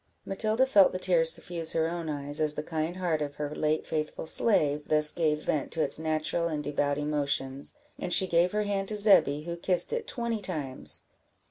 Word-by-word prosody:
Matilda 215 +6 0
felt 205 -8 +4
the - - -2
tears 175 -3 +2
suffuse 165 -1 -1
her 160 0 +1
own 170 -1 -5
eyes, 145 0 -2
as 150 -1 +1
the 150 - -4
kind 160 +2 -3
heart 170 -4 -1
of 145 -1 -4
her 150 0 -5
late 155 0 -1
faithful 155 0 -4
slave 150 -6 +1
thus 150 0 +5
gave 155 -3 -1
vent 145 -3 -1
to 160 - +1
its - - -1
natural 160 +1 -1
and 150 -2 -3
devout 145 -1 -1
emotions; 140 - -3 0.2
and 180 - -4
she 190 - +5
gave 175 0 +2
her 210 0 -1
hand 200 -1 -2
to 215 - -3
Zebby, 175 -8 +4
who 170 +1 -5
kissed 180 - +3
it 475 -1 -3
twenty 235 -3 -3
times. 150 -9 -4
160 Hz, 200 wpm, -28 LUFS, 150-185 Hz, 0.2 s, thus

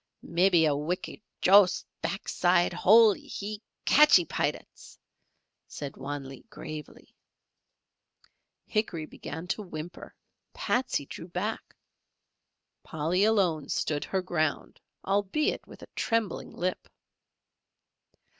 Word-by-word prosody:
"Mebbee 170 0 +3
a 150 -2 +2
wicked 165 +8 -4 0.2
Joss 195 0 +5 0.2
backside 175 -3 +1
holee, 215 +4 +5
He 210 +1 -6 0.2
catchee 295 - +6
Pilats," - - -4 0.7
said 140 -2 -7
Wan 140 -1 -5
Lee, 135 - -11
gravely. 155 -7 -9 1.5
Hickory 195 -8 -2
began 160 +2 -8
to 210 - -1
whimper, 175 -3 -8 0.4
Patsey 245 - -1
drew 165 - -9
back, 185 +5 -4 1.1
Polly 165 +5 0
alone 185 -9 +1
stood 145 -2 -1
her 190 -1 -1
ground, 155 -4 -2 0.2
albeit 200 +9 0
with - - -13
a - - -11
trembling 225 -3 -1
lip. 185 +1 -3
180 Hz, 100 wpm, -28 LUFS, 155-205 Hz, 1.5 s, catchee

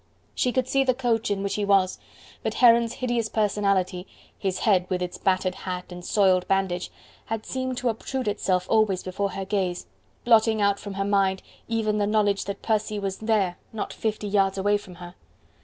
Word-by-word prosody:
She 250 - +1
could 255 0 0
see 270 +1 +2
the 255 -2 +2
coach 235 -4 0
in 200 -1 -1
which 200 0 -1
he 210 - -1
was, 195 -2 +2 0.4
but - - -3
Heron's 235 -1 +5
hideous 240 -3 -1
personality, 200 -3 0 0.3
his 190 -2 -2
head 185 -5 +3
with 185 -2 0
its 180 0 -4
battered 185 -1 +1
hat 180 -1 -6
and 180 0 -8
soiled 185 -2 +3
bandage, 190 -2 0 0.4
had 225 -1 -3
seemed 260 -1 -3
to 250 - 0
obtrude 255 +2 -3
itself 185 -3 0
always 215 -4 +2
before 195 +1 -2
her 195 - -4
gaze, 190 -3 -1 0.4
blotting 225 -2 +4
out 200 -1 +2
from 200 -2 -7
her 195 0 -1
mind 195 -2 +1 0.2
even 215 -2 0
the 205 - +1
knowledge 205 -2 +1
that 200 0 -6
Percy 215 -1 0
was 195 -1 -3
there 215 -5 0
not 220 - -4
fifty 215 -1 -3
yards 195 -1 +2
away 205 +2 +2
from 190 -3 -6
her. 175 0 -10
200 Hz, 190 wpm, -25 LUFS, 190-220 Hz, 0.4 s, Heron's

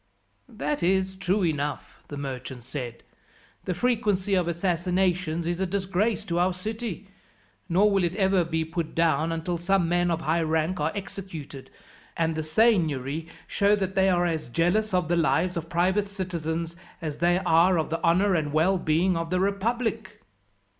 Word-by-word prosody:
"That 145 +1 -3
is 190 +2 +1
true 190 +1 0
enough," 145 -3 -3
the 145 - -7
merchant 130 -3 -6
said. 125 -2 -6 0.6
"The 180 - -2
frequency 210 -4 +1
of 180 -3 +2
assassinations 175 -1 0
is 175 +1 -2
a 190 - +1
disgrace 200 +3 -1
to 175 -3 -1
our 180 +1 +2
city; 215 +1 -5 0.6
nor 200 +5 +4
will 195 -2 +2
it 175 +1 -1
ever 190 -3 +3
be 160 -1 -1
put 165 0 -4
down 165 -1 +2
until 165 +1 -2
some 185 0 +2
men 175 +1 +2
of 165 -1 -1
high 160 +2 +1
rank 160 +2 0
are 150 +2 0
executed, 175 -9 -7 0.5
and 165 -1 +1
the 160 - -2
seignory 160 - +1 0.2
show 205 0 +2
that 190 -2 -2
they 190 0 +3
are 175 -1 +2
as 160 -7 -2
jealous 175 - +1
of 180 -3 +1
the 175 - +1
lives 170 +2 +1
of 165 -1 -4
private 185 +4 +1
citizens, 170 -4 -4 0.2
as 155 -4 -5
they 175 +1 +3
are 175 0 +4
of 160 -1 -1
the 165 - -2
honour 185 +4 +3
and 150 -4 0
well 180 +5 +3
being 170 +3 +2
of 165 0 -2
the 180 +1 +1
republic." 210 +1 -2
175 Hz, 170 wpm, -26 LUFS, 160-190 Hz, 0.6 s, nor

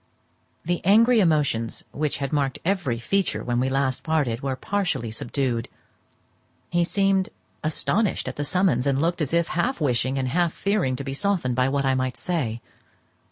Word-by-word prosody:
The 175 +1 -1
angry 225 +6 +5
emotions 145 - +1
which 150 -1 -2
had 140 +1 -3
marked 140 -2 0
every 175 -11 0
feature 195 +11 0
when 120 -1 0
we 130 +1 +1
last 135 -1 0
parted 145 -7 0
were 135 -1 -1
partially 180 - -2
subdued. 120 0 -2 1.0
He 175 0 +3
seemed 195 +1 +1 0.3
astonished 160 +6 0
at - - -4
the 145 - -2
summons, 145 -5 +1
and 135 -1 +2
looked 170 +2 0
as 145 - -1
if 170 0 +1
half 235 +11 0
wishing 130 -2 +1
and 130 -1 -1
half 170 +4 +1
fearing 195 -11 0
to 140 - -5
be 135 0 -4
softened 170 -6 0
by 130 +1 +2
what 140 0 0
I 135 - +3
might 130 -1 -1
say. 125 -11 -2
145 Hz, 170 wpm, -24 LUFS, 130-175 Hz, 1.0 s, angry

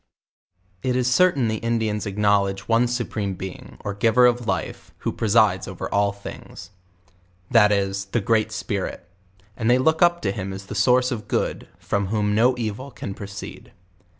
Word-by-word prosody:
It 125 +3 0
is 125 0 +2
certain 145 -6 +3
the 110 0 -1
Indian,! 110 -2 -1
acknowledge 100 -1 +1
one 115 +1 +3
Supreme 110 -5 -2
Being, 95 +1 -8
or 100 - -4
Giver 115 +4 +4
of 120 -1 +2
Life, 95 -4 -3
who - - +1
presides 105 -4 +2
over 95 - -5
all 100 0 +3
thiags, 100 -2 -10 0.8
That 110 -4 +6
is, 100 -1 0
the 100 +5 -1
Great 110 +1 +1
Spirit; 100 -5 -4 0.5
and 115 -1 -1
they 125 - +5
look 160 +5 +2
up 175 0 +4
to 95 - +1
him 95 -2 -5
as 95 0 -8
the 100 - -7
source 125 +5 +3
of 105 -4 -4
good, - - -2
from 100 -1 -2
whom 105 0 0
no 120 +4 +4
evil 115 +3 -4
can 100 -6 -7
proceed. 100 0 -9
105 Hz, 170 wpm, -23 LUFS, 100-120 Hz, 0.8 s, That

